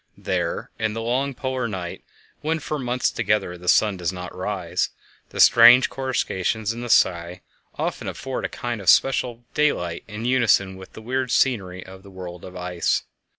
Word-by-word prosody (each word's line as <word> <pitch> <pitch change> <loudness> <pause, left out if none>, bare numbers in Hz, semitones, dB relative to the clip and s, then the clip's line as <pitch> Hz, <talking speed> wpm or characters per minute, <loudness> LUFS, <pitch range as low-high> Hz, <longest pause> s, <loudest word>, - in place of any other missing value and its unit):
There, - - -2
in 110 -1 0
the 115 - -4
long 130 +3 -1
polar 130 -2 -2
night, 90 -5 -6 0.4
when 160 +2 0
for 155 -1 -4
months 125 -1 0
together 105 -5 0
the 90 0 -12
sun 105 +1 +4
does 85 -1 -1
not 90 -1 -7
rise, 90 -2 -2 0.4
the - - -8
strange 120 +2 +8
coruscations 115 -5 -1
in 120 - -7
the 120 - -5
sky 90 -3 +2 0.3
often - - -3
afford 135 -1 -4
a - - -2
kind 120 -3 -4
of 95 - +1
spectral 120 - +3
daylight 90 - 0
in 105 +3 -6
unison 115 -7 +3
with 95 0 -12
the 110 - -11
weird 130 +2 -1
scenery 95 -9 0
of 95 0 -12
the 100 - -14
world 90 -2 -9
of 90 - -10
ice. 90 -1 -1
105 Hz, 175 wpm, -23 LUFS, 90-125 Hz, 0.4 s, strange